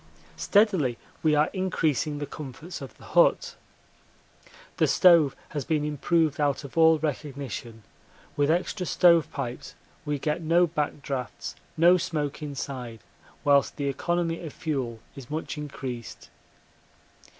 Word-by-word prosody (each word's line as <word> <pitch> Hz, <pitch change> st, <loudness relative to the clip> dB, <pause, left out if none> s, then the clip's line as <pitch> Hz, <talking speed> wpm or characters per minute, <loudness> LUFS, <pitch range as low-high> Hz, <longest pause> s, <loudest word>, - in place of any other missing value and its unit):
Steadily 190 Hz, -, +2 dB, 0.2 s
we 155 Hz, -1 st, +3 dB
are 150 Hz, +1 st, +2 dB
increasing 160 Hz, -6 st, 0 dB
the 145 Hz, -, -3 dB
comforts 150 Hz, +5 st, -8 dB
of -, -, -9 dB
the -, -, -17 dB
hut. -, -, +3 dB, 1.2 s
The -, -, +3 dB
stove 170 Hz, -7 st, +5 dB
has 145 Hz, -2 st, -3 dB
been 150 Hz, 0 st, 0 dB
improved 150 Hz, +1 st, +1 dB
out 145 Hz, -1 st, +1 dB
of 140 Hz, -, -10 dB
all 160 Hz, -1 st, +6 dB
recognition; 140 Hz, -6 st, -5 dB, 0.5 s
with 145 Hz, 0 st, +2 dB
extra 180 Hz, +2 st, 0 dB
stove 170 Hz, -4 st, +4 dB
pipes 125 Hz, -4 st, -6 dB, 0.3 s
we 150 Hz, -2 st, -2 dB
get 150 Hz, +4 st, -2 dB
no 170 Hz, +2 st, +4 dB
back 150 Hz, -3 st, -3 dB
draughts, 130 Hz, -3 st, -5 dB, 0.2 s
no 175 Hz, +3 st, +6 dB
smoke 150 Hz, -4 st, -3 dB
inside, 130 Hz, -6 st, -6 dB, 0.4 s
whilst 140 Hz, -1 st, +3 dB
the 140 Hz, -1 st, -1 dB
economy 170 Hz, +4 st, -1 dB
of 155 Hz, -, -7 dB
fuel 130 Hz, -8 st, -3 dB
is 135 Hz, -3 st, -10 dB
much 155 Hz, +2 st, -4 dB
increased. 135 Hz, -5 st, -7 dB
150 Hz, 130 wpm, -26 LUFS, 140-165 Hz, 1.2 s, all